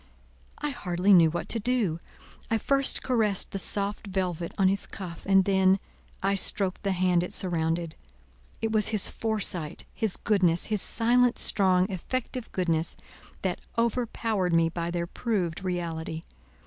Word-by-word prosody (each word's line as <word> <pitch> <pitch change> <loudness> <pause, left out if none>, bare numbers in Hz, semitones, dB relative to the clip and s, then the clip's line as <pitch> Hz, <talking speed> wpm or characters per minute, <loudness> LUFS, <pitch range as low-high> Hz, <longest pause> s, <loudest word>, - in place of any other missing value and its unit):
I 295 -1 -3
hardly 185 -5 +1
knew 170 -3 +7
what 175 - -4
to 230 - -1
do. 215 -8 0 0.5
I 225 - +2
first 275 +4 0
caressed 220 -6 +1
the 195 - -3
soft 200 +2 0
velvet 180 -3 -2
on 195 - +4
his 195 +1 +1
cuff, 175 -4 -8
and 195 -1 +5
then. 190 -1 +4 0.5
I 195 +1 +2
stroked 195 -1 +1
the 195 -1 0
hand 180 -1 +2
it 180 - -5
surrounded. 165 -2 0 0.7
It 225 - 0
was 215 -2 +2
his 215 -3 +1
foresight, 200 -8 -1
his 220 -4 -1
goodness, 180 -6 +2
his 210 - +2
silent, 245 +1 +3
strong, 185 -2 +3
effective 250 +6 -4
goodness, 170 -3 -1 0.5
that 185 -2 -2 0.2
overpowered 225 -5 0
me 165 0 +3
by 170 0 -3
their 170 0 -2
proved 190 -3 -2
reality. 165 -3 -4
190 Hz, 150 wpm, -27 LUFS, 175-220 Hz, 0.7 s, knew